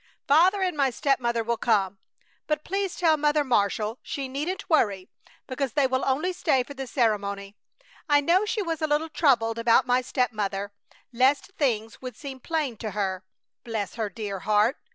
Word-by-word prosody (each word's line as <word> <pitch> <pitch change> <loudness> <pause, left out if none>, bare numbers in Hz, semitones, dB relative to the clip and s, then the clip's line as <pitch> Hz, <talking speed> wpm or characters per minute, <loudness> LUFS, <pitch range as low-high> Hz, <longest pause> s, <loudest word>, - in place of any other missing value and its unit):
Father 365 +7 +4
and 365 -3 0
my 275 -2 +2
stepmother 240 -3 0
will 235 +1 -1
come; 200 -5 +1 0.5
but 305 0 -1
please 390 -1 -2
tell 320 -3 +3
Mother 295 0 +2
Marshall 215 -2 0
she 275 -3 -4
needn't 300 +9 -4
worry 200 - +1 0.3
because 265 -1 -3
they 285 -2 +3
will 260 0 0
only 305 +8 0
stay 300 -7 +1
for 285 - -10
the 270 -1 -6
ceremony. 200 -5 -1 0.5
I 290 0 +6
know 340 +7 +3
she 425 0 -1
was 330 -3 -3
a 310 - +1
little 300 +2 0
troubled 230 -8 +2
about 230 +2 +4
my 250 0 +2
stepmother, 205 -6 -2 0.4
lest 265 +8 +2
things 225 -6 -1
would 255 -1 -7
seem 275 -3 -8
plain 295 -5 -2
to 215 0 -5
her; 190 -2 -1 0.4
bless 220 -4 -3
her 220 -3 -3
dear 200 0 -5
heart! 210 - +2
260 Hz, 175 wpm, -26 LUFS, 220-300 Hz, 0.5 s, I